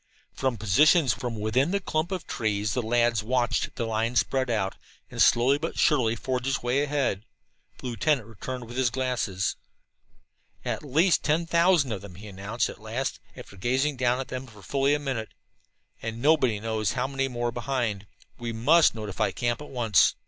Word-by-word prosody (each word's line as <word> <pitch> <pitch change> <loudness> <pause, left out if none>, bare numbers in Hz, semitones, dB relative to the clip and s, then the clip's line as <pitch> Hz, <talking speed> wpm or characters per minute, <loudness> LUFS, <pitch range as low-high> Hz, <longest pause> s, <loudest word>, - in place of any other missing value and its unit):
From 130 -3 -1
positions 140 - +4
within 120 +3 0
the 200 +2 +1
clump 160 -1 -2
of 185 -3 -3
trees 105 -2 -1
the 125 - 0
lads 120 -1 +2
watched 120 +2 0
the 115 - -2
line 115 +2 -1
spread 130 +1 +1
out 100 -4 0 0.4
and - - -2
slowly 130 +4 +5
but 165 +2 -4
surely 125 -7 +3
forge 125 +2 -3
its 135 -2 -1
way 125 +3 +1
ahead. 140 -8 0 0.5
The - - -12
lieutenant 125 +1 0
returned 120 +3 -7
with 120 +2 -9
his 130 -2 +3
glasses. 125 -7 -1 1.1
"At - - -2
least 160 +6 +3
ten 160 +3 +1
thousand 170 -5 +3
of 105 - -3
them," 100 -3 -11
he 105 +4 -11
announced 100 +4 -2
at - - -10
last, 115 +5 -3 0.2
after - - -11
gazing 130 +8 0
down 125 0 +1
at 135 - -5
them 130 +1 -5
for 105 -4 -15
fully 140 +7 +2
a - - +1
minute. 130 -6 -4 0.7
"And 115 0 -5
nobody 130 -6 +3
knows 110 -4 -1
how 125 - -1
many 135 0 -1
more 120 -2 -2
behind. 120 -5 -2 0.3
We 120 -1 -3
must 145 +9 +4
notify 105 -3 -2
the - - -5
camp 120 +2 -1
at 150 - -9
once." 115 -6 +3
120 Hz, 180 wpm, -26 LUFS, 110-135 Hz, 1.1 s, slowly